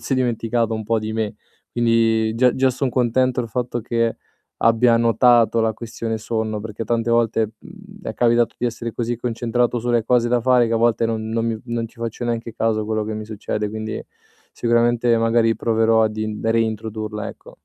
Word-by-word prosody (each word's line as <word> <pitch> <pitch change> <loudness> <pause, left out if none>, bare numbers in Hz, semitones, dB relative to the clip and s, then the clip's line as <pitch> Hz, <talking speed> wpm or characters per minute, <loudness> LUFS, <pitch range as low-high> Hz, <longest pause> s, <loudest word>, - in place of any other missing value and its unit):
forse 115 +3 -1
dimenticato 115 -2 0
un 110 0 -2
po' 115 +1 +1
di 110 0 -4
me. 110 -2 -2 0.4
Quindi 115 -2 +2
già 125 +1 +3
già 130 0 +3
son 130 +2 -1
contento 125 +1 +1
il 115 - -6
fatto 120 +1 -2
che 115 0 -1 0.5
abbia 115 +1 +4
notato 115 0 +4
la 110 0 +1
questione 115 0 -5
sonno, 110 -1 -3
perché 110 +1 -6
tante 115 +1 0
volte, 115 -2 +1
mhmm, 200 0 -14
è - - -4
capitato 120 -1 +2
di 125 - 0
essere 115 0 -4
così 120 +1 -2
concentrato 120 +1 -1
sulle 120 -1 0
cose 120 0 +2
da 120 0 +2
fare 125 0 +4
che - - -2
a - - +3
volte 115 0 +2
non 110 -1 -3
non 115 0 -1
mi 115 -1 -2
non 115 -1 -3
ci 115 - -24
faccio 115 +1 -4
neanche 115 -1 -3
caso 110 -1 0
quello 110 0 -1
che 110 +1 -4
mi 110 0 -5
succede, 105 0 -3
quindi 110 0 -4 0.5
sicuramente 120 0 +2
magari 115 0 +2
proverò 115 0 +2
ad 110 -1 0
in 110 -1 -3
da 115 - 0
reintrodurla, 110 -1 -2
ecco. - - -13
115 Hz, 195 wpm, -21 LUFS, 110-120 Hz, 0.5 s, abbia